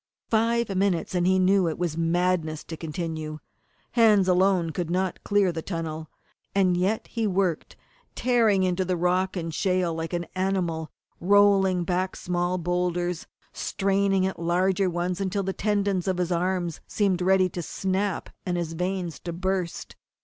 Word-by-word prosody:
Five 230 -2 +1
minutes 185 -3 0
and 180 -1 +1
he 190 0 +4
knew 190 0 +4
that 165 - 0
it - - -12
was 170 -3 -2
madness 165 -1 0
to 165 - -7
continue. 160 -1 -5 0.5
Hands 215 -5 +5
alone 180 -2 +3
could 170 +1 -3
not 185 +1 -1
clear 200 -3 +2
the 165 -1 -4
tunnel. 160 -3 -5 0.5
And 185 -2 +3
yet 190 +5 0
he 230 -2 -2
worked, 185 -4 -1 0.4
tearing 225 -6 +3
into 185 0 +1
the 180 -1 -1
rock 185 +2 +1
and 165 -2 -4
shale 180 0 +1
like 165 +1 -4
an 170 0 -1
animal; 180 -4 -1 0.3
rolling 195 -1 +4
back 185 +2 -1
small 180 0 -1
boulders, 175 0 -1 0.3
straining 195 -1 +1
at 190 - -3
larger 185 +3 +1
ones 175 +2 -2
until 195 +1 -1
the 190 0 -2
tendons 200 -3 0
of 185 -1 0
his 180 0 -1
arms 175 -1 -1
seemed 195 -4 +1
ready 190 0 +4
to 175 - -5
snap 190 +3 -2
and 180 -2 -2
his 165 -2 -3
veins 180 -1 -3
to 170 - -5
burst. 185 0 -3
180 Hz, 160 wpm, -26 LUFS, 170-195 Hz, 0.5 s, Hands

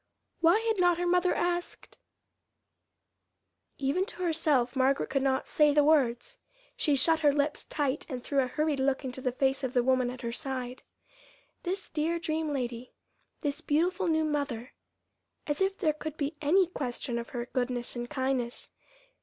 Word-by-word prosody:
Why 340 +4 +5
had 450 -3 0
not 355 -1 +4
her 355 - -1
mother 360 +1 +3
asked 350 0 -3 1.8
Even 280 +7 +1
to 370 -6 -6
herself 300 -7 +2
Margaret 265 +1 +2
could 275 0 +1
not 265 -1 0
say 295 -1 +3
the 295 - +6
words. 275 -6 +2 0.4
She 295 - +2
shut 320 +4 +3
her 295 -2 +4
lips 290 +1 -1
tight 290 -1 -2
and 250 -3 -5
threw 280 - 0
a 260 - +2
hurried 300 +2 0
look 265 +1 +1
into 260 0 -5
the 255 - 0
face 270 +2 0
of 260 -1 -2
the 245 - +4
woman 255 -1 +2
at 250 0 -8
her 235 - -2
side. 255 0 -4 0.8
This 375 +1 -4
dear 320 +2 0
dream 320 -2 -2
lady, 250 -3 -4 0.5
this 290 0 -2
beautiful 350 +4 +1
new 315 -1 +2
mother 280 -5 -2 0.7
as 295 +4 -2
if 385 0 +1
there 315 -6 +1
could 310 0 -6
be 290 +2 -2
any 360 +6 +4
question 245 -7 -3
of 235 - -7
her 240 -1 -4
goodness 245 -1 -2
and 240 0 -4
kindness! 260 -4 -2
285 Hz, 170 wpm, -29 LUFS, 255-325 Hz, 1.8 s, the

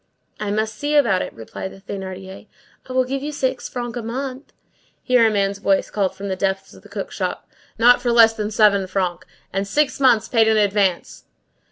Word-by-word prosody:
"I 210 - -3
must 215 +2 -1
see 295 +1 -1
about 195 -11 +3
it," - - -4
replied 115 +11 -8
the - - -13
Thénardier. 190 0 -8 0.4
"I - - -6
will 255 0 +3
give 270 +2 -3
you 295 +2 -4
six 260 -3 -2
francs 240 -1 -4
a - - -4
month." 260 +4 -5 0.5
Here 250 -3 +4
a - - +3
man's 200 -1 0
voice 195 -1 +1
called 195 -3 -1
from 200 - -6
the 190 - -2
depths 195 0 -2
of - - -15
the - - -17
cook - - -5
shop:— - - -4 0.3
"Not 245 +2 +6
for 245 -1 0
less 230 -1 +6
than 215 -1 -3
seven 205 -3 +3
francs. 185 -2 -2 0.3
And 195 +1 -1
six 295 +7 +1
months 250 -5 +4
paid 225 -2 +3
in 220 0 +3
advance." 200 -3 0
215 Hz, 205 wpm, -21 LUFS, 195-245 Hz, 0.5 s, Not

